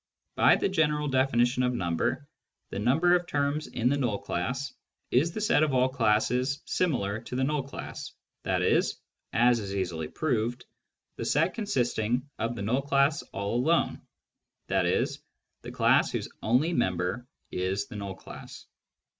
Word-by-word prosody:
By - - +5
the - - +1
general 150 -5 +1
definition 130 -1 +2
of 125 0 +1
number, 85 -6 -1 0.4
the - - -3
number 150 +11 +3
of 175 -1 +2
terms 145 +1 -1
in 120 - -1
the 140 +3 +2
null 120 -6 0
class 125 +11 -3 0.4
is 150 +8 +3
the 215 - -4
set 205 -7 +3
of 150 -4 +2
all 130 0 +4
classes 125 +2 +1
similar 110 - 0
to - - -7
the 130 - +1
null 150 +1 +1
class, 135 +1 -7 0.3
i.e. - - +3 0.5
(as 120 0 +4
is 100 -2 -5
easily 85 -5 -2
proved) 120 - -1 0.5
the - - -4
set 165 +5 +2
consisting 125 - 0
of 115 +2 -1
the 100 - -4
null 125 +6 +1
class 140 +1 +2
all 100 +2 -3
alone, 165 +7 +1 0.7
i.e. - - +2 0.6
the - - -8
class - - +3
whose - - -3
only 130 +10 +2
member 95 - -1 0.2
is 95 +2 -1
the 120 - -11
null 100 -2 -5
class. - - -11
125 Hz, 155 wpm, -28 LUFS, 105-145 Hz, 0.7 s, By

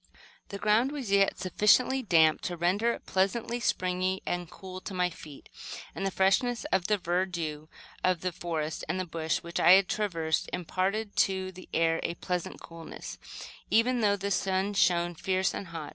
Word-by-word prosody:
The 200 - -5
ground 215 +6 +2
was 270 -8 -5
yet 200 0 +3
sufficiently 210 +8 +3
damp 160 -8 +4
to 175 - -5
render 200 +8 +2
it - - -10
pleasantly 225 +5 0
springy 185 -3 0
and 175 -1 -3
cool 185 -1 -9
to 195 - -7
my 180 -1 +1
feet, 150 -3 -12 0.5
and - - -5
the - - +1
freshness 230 +8 +1
of 180 - +1
the 210 - +2
verdure 170 -4 -2 0.4
of 185 -3 +2
the 185 - -1
forest 160 -2 -4
and 185 0 -2
bush 160 -1 -1
which 170 0 -4
I 185 +2 +8
traversed 170 -6 -1
imparted 195 +4 -2
to 190 -1 +1
the 185 0 -13
air 165 0 +2
a 170 - -3
pleasant 180 -1 -4
coolness, 165 -1 -9 0.5
even 240 +2 +3
though 205 -2 +3
the 200 +1 -3
sun 190 +1 0
shone 175 -3 +2
fierce 190 +2 0
and 195 - -5
hot. 165 -3 -7
185 Hz, 170 wpm, -29 LUFS, 170-200 Hz, 0.5 s, I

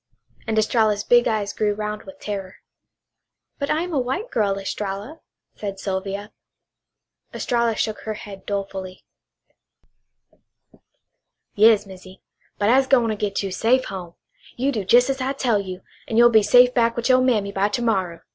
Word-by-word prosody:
And 220 -1 -1
Estralla's 215 -1 +2
big 240 +1 +4
eyes 215 -3 -1
grew 210 -1 0
round 210 0 -5
with 285 0 -12
terror. 195 -2 -6 1.0
"But 280 - -2
I 315 +2 +1
am 355 -1 -6
a 285 - +1
white 265 - -3
girl, 200 -3 0
Estralla," 200 +8 -5 0.4
said 200 -2 -5
Sylvia. 195 +2 -4 1.0
Estralla 235 -2 0
shook 215 0 -2
her 215 -1 -5
head 200 -2 -11
dolefully. 195 -2 -5 2.5
"Yas, 215 0 +5
Missy. 185 0 -13 0.4
But 205 +1 +1
I'se 265 +1 +4
gwine 245 -4 +3
to 215 - -1
git 205 -1 -2
you 195 - -3
safe 250 +7 +2
home. 175 -3 -8 0.4
You 265 +3 0
do 210 -7 -4
jes' 245 +3 +5
as 265 -1 -4
I 265 +2 -1
tell 240 -6 +1
you 185 -1 -6 0.3
an' 225 - -2
you'll 240 0 +7
be 220 -1 +6
safe 245 +4 +5
back 230 -2 +2
with 235 - -2
your 255 -1 +5
mammy 215 -6 +1
by 200 +1 0
ter 240 +3 -2
morrow!" 185 -7 -1
215 Hz, 165 wpm, -22 LUFS, 195-245 Hz, 2.5 s, you'll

